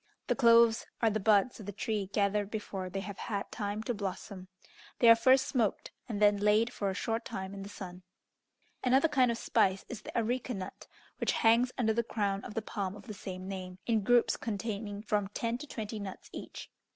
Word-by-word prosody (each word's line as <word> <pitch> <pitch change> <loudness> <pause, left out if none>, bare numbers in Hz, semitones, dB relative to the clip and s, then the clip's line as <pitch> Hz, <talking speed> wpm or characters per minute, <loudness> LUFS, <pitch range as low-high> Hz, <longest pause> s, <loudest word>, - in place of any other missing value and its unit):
The - - +1
cloves 230 -3 +5 0.2
are 225 - +5
the 215 - 0
buds 215 +4 +3
of 205 - -9
the - - -3
tree 205 0 -2
gathered 200 0 0
before 195 -4 -4
they 195 +2 -3
have 195 0 -7
had 200 -3 -3
time 205 +1 -3
to 245 - -1
blossom. 195 -2 -5 0.5
They 240 - +4
are - - +9
first 260 +3 +5
smoked, 230 -7 0 0.2
and 210 -3 -2
then 205 -1 +5
laid 210 +4 +3
for 200 -4 -1
a 190 - -3
short 225 +3 -1
time 190 -2 -5
in 200 - -7
the 200 - -7
sun. 185 -3 -8 0.8
Another 265 +5 +4
kind 260 -5 +3
of 235 - 0
spice 195 -5 +1
is 225 -3 -6
the - - -6
areca 245 +2 -1
nut, 185 -1 -7 0.3
which - - +1
hangs 235 +2 +4
under 220 -3 +2
the 235 - +2
crown 200 -4 -2
of - - -8
the 225 - -1
palm 195 -3 -3
of 205 -1 -12
the 215 - -6
same 185 -1 -7
name, 185 -2 -6
in 225 -2 +2
groups 240 +3 +3
containing 210 -1 -4
from 210 -2 0
ten 235 +1 -1
to 300 - -8
twenty 220 -4 -5
nuts 195 -2 -8
each. - - -8
210 Hz, 210 wpm, -31 LUFS, 200-230 Hz, 0.8 s, are